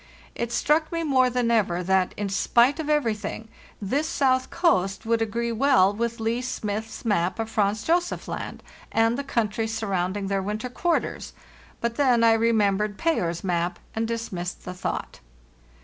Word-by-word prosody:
It 235 0 -3
struck 305 +7 +1
me 335 -1 -1
more 260 -4 +3
than 245 -1 0
ever 185 -6 +1
that, 190 0 +1
in 205 - -2
spite 240 +8 +3
of 310 -1 -3
everything, 225 -6 -1 0.3
this 275 +10 -1
south 260 -3 +2
coast 220 - +1
would 230 0 +1
agree 235 +2 -1
well 230 -5 +4
with 235 +2 -2
Leigh 225 +2 0
Smith's 220 -2 -4
map 185 -4 +1
of 225 -1 -3
Franz 210 0 +1
Josef 350 +1 0
Land - - -6 0.3
and 225 +1 +3
the 280 - -3
country 225 -4 -1
surrounding 200 -3 -2
their 195 0 0
winter 210 +5 -3
quarters; 340 +7 -1 0.5
but 235 0 -2
then 255 -5 +4
| - - +3 0.2
remembered 210 -3 +2
Payer's 175 - 0
map 175 -1 -1 0.2
and 225 0 0
dismissed 215 -6 -4
the 180 - -5
thought. 185 - -4
225 Hz, 160 wpm, -25 LUFS, 200-250 Hz, 0.5 s, well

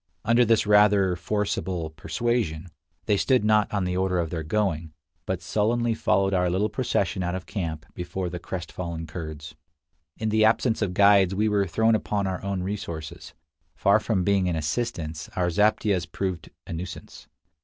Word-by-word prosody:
Under 115 +2 +5
this 115 -2 +3
rather 105 -3 +4
forcible 90 -3 -2
persuasion, 80 +1 -2 0.4
they 105 -2 +2
stood 130 0 +2
not 105 -1 +3
on 100 -2 0
the 90 0 -1
order 95 0 +1
of 85 -2 -1
their 80 - -2
going, 80 -2 -1 0.3
but 95 -2 -2
sullenly 115 +4 +1
followed 100 -3 +1
our 90 -1 +2
little 95 +5 +1
procession 100 -7 -1
out 90 0 -1
of 95 - -6
camp 80 -7 -4
before 90 +1 -4
the 90 0 -5
crestfallen 85 -2 -5
Kurds. 75 -1 -7 0.6
In 110 - -1
the 110 0 +3
absence 110 +1 +2
of 95 -4 -1
guides 100 -2 +5
we 105 +2 +2
were 100 -2 +1
thrown 110 +5 +2
upon 105 -2 0
our 95 -1 -3
own 100 -2 -2
resources. 85 -8 -6 0.4
Far 100 +2 +4
from 105 -4 0
being 95 -1 +2
an 85 - -1
assistance, 80 -2 -3
our 90 -1 +1
zaptiehs 100 -2 +1
proved 95 -4 -3 0.2
a - - -7
nuisance. 85 +2 -8
95 Hz, 165 wpm, -25 LUFS, 85-105 Hz, 0.6 s, Under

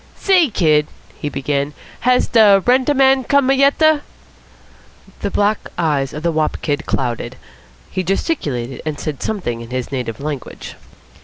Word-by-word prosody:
"Say, 365 -6 +3
kid," 155 -7 +2 0.3
he 150 - -3
began, 140 +1 -2 0.2
"has 250 +1 +3
da 210 -4 +6
rent 255 +2 +3
a 290 - +2
man 265 0 +4
come 280 0 +3
yet 275 +1 +3
a?" 310 -2 +4 1.2
The - - -2
black 205 +1 0
eyes 145 -5 0
of 150 - -7
the 170 - +1
wop 155 -1 0
kid 145 0 -2
clouded. 120 -1 -2 0.6
He 185 - -1
gesticulated, 150 - -2
and 155 -2 -4
said 150 -4 -5
something 150 - -3
in 115 - -10
his 130 0 -4
native 125 -5 -4
language. 145 -3 -6
155 Hz, 155 wpm, -18 LUFS, -, 1.2 s, da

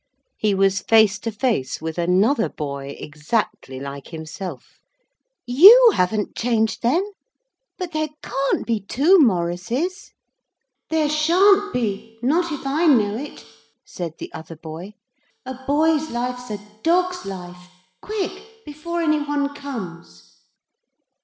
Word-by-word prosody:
He 210 -2 +1
was 195 0 +2
face 220 -1 +4
to 230 - -4
face 215 - -1
with 160 +1 -5
another 195 +9 +2
boy, 140 -1 -6
exactly 150 - -3
like 140 0 -7
himself. 160 -2 -8 0.7
'You 415 - +9
haven't 200 +3 0
changed, 225 -2 0
then 320 - +1 0.7
but 360 -2 -5
there 310 -1 -1
can't 275 0 -1
be 230 -2 0
two 290 - +3
Maurices.' 235 - 0 0.8
'There 315 -2 +1
sha'n't 375 +7 +3
be; 225 -1 -3
not 330 +6 +1
if 295 -2 -6
I 305 +5 +1
know 215 -8 +4
it,' 280 +6 -8 0.4
said 170 -3 -6
the - - -9
other 160 +1 -9
boy; 165 +6 -9 0.5
'a 260 - -5
boy's 310 +2 +2
life's 245 +1 -4
a 210 - -3 0.2
dog's 360 +3 +1
life. 180 -2 -9 0.3
Quick, 430 +2 -6
before 335 +3 -4
any 310 -2 +2
one 290 -1 -1
comes.' 180 - -9
240 Hz, 125 wpm, -22 LUFS, -, 0.8 s, You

